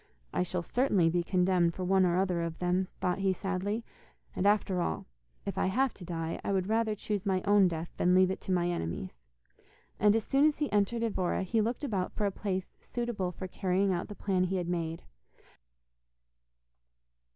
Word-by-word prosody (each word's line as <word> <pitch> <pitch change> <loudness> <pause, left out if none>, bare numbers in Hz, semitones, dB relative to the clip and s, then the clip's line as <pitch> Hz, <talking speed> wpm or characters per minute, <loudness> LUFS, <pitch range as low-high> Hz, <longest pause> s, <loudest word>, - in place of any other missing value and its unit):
'I - - +1
shall 180 -1 -2
certainly 200 -8 +2
be 175 +1 +2
condemned 180 -1 +2
for 185 - -4
one 190 0 +4
or 175 0 +1
other 185 -2 +1
of 165 -1 -3
them,' 180 +1 0
thought 180 0 0
he 195 -1 +2
sadly; 195 +4 -2 0.5
'and 195 - +1
after 200 -3 +2
all, 80 - -2 0.4
if - - -3
I - - +2
have 260 +7 +1
to 185 - -12
die, 165 -2 -4
I - - -1
would 190 -2 +1
rather 220 +1 +1
choose 205 -1 -3
my 190 -2 0
own 205 -2 +5
death 165 -1 -4
than 180 +1 +3
leave 185 0 +5
it - - -4
to - - -4
my 175 -1 +2
enemies,' 95 - -4 0.8
and 210 +1 +5
as 225 - +1
soon 275 +6 +4
as 305 - 0
he 295 -1 -1
entered 210 +3 +1
Evora 190 -5 0
he 220 +4 +1
looked 235 +6 -2
about 195 -9 -1
for 210 - -1
a 200 - +1
place 190 -1 -3
suitable 235 -7 -3
for 185 +1 -6
carrying 190 +1 +1
out 175 - -2
the 205 - -8
plan 185 -3 +1
he 185 +1 -1
had 180 -2 -1
made. 165 -2 -2
185 Hz, 195 wpm, -30 LUFS, 180-205 Hz, 0.8 s, own